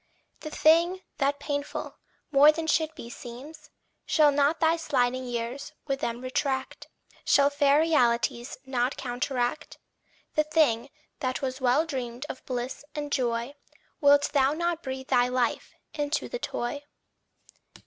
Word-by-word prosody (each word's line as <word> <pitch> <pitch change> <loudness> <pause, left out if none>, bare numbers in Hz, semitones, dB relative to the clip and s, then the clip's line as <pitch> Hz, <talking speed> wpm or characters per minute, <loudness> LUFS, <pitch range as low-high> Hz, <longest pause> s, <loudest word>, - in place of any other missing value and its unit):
The 310 - -7
thing 335 +5 +3 0.2
that 285 0 +1
painful, 285 0 -4 0.3
more 290 +1 +7
than 320 +1 -4
should 315 0 +1
be, - - -9
seems, 245 +6 -10 0.4
Shall 300 -2 +5
not 285 +3 +2
thy 325 0 +4
sliding 255 -5 0
years 240 +2 -4
with 275 -2 -2
them 235 -1 -3
retract 265 +1 -2 0.4
Shall 280 0 +4
fair 285 +1 +4
realities 240 -6 +1
not 255 0 -1
counteract? 245 +2 -2 0.6
The 305 - +3
thing 290 -6 +2 0.3
that 255 +1 -2
was 260 0 -3
well 260 +5 +3
dreamed 250 -3 -5
of 260 - -7
bliss 250 +1 -4
and 290 -1 -4
joy 240 -1 -1 0.5
Wilt 285 0 +5
thou 275 -1 +3
not 340 +1 -1
breathe 265 -2 -6
thy 245 0 +4
life 250 -2 -1 0.2
into 290 0 -1
the - - -5
toy? 285 - -3
275 Hz, 140 wpm, -27 LUFS, 250-300 Hz, 0.6 s, more